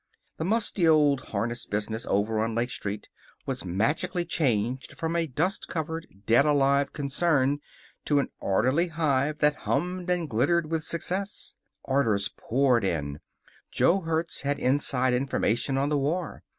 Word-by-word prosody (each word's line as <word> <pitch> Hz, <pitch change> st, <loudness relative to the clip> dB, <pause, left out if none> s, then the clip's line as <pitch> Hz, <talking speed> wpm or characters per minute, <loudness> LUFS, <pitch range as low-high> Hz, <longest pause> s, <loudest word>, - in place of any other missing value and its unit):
The 160 Hz, -, -2 dB
musty 210 Hz, -4 st, +1 dB
old 145 Hz, -4 st, +4 dB
harness 115 Hz, +4 st, -3 dB
business 105 Hz, +3 st, -3 dB
over 105 Hz, +2 st, +1 dB
on 115 Hz, 0 st, -2 dB
Lake 120 Hz, +2 st, -1 dB
Street 105 Hz, -2 st, -4 dB, 0.4 s
was 130 Hz, -2 st, -3 dB
magically 150 Hz, -, 0 dB
changed 130 Hz, -6 st, -1 dB
from 165 Hz, +1 st, -2 dB
a 165 Hz, -1 st, +1 dB
dust 160 Hz, +8 st, -1 dB
covered, 160 Hz, -1 st, -4 dB, 0.2 s
dead 115 Hz, +6 st, +5 dB
alive 140 Hz, -1 st, +3 dB
concern 145 Hz, -1 st, +1 dB, 0.5 s
to 145 Hz, -, +2 dB
an 140 Hz, -, +1 dB
orderly 130 Hz, -, +2 dB
hive 150 Hz, -3 st, 0 dB
that 150 Hz, 0 st, +3 dB
hummed 180 Hz, +4 st, -1 dB
and 175 Hz, -2 st, 0 dB
glittered 155 Hz, +7 st, +1 dB
with 160 Hz, -1 st, -1 dB
success. 185 Hz, +5 st, -4 dB, 0.3 s
Orders 115 Hz, -8 st, +1 dB
poured 125 Hz, -2 st, +2 dB
in. 75 Hz, -6 st, -2 dB, 0.5 s
Jo 185 Hz, +3 st, +3 dB
Hertz 165 Hz, 0 st, -2 dB
had 145 Hz, 0 st, -1 dB
inside 130 Hz, -2 st, +2 dB
information 130 Hz, 0 st, 0 dB
on 140 Hz, +1 st, +1 dB
the 150 Hz, -1 st, +1 dB
war. 165 Hz, +5 st, -2 dB
140 Hz, 145 wpm, -27 LUFS, 120-165 Hz, 0.5 s, dead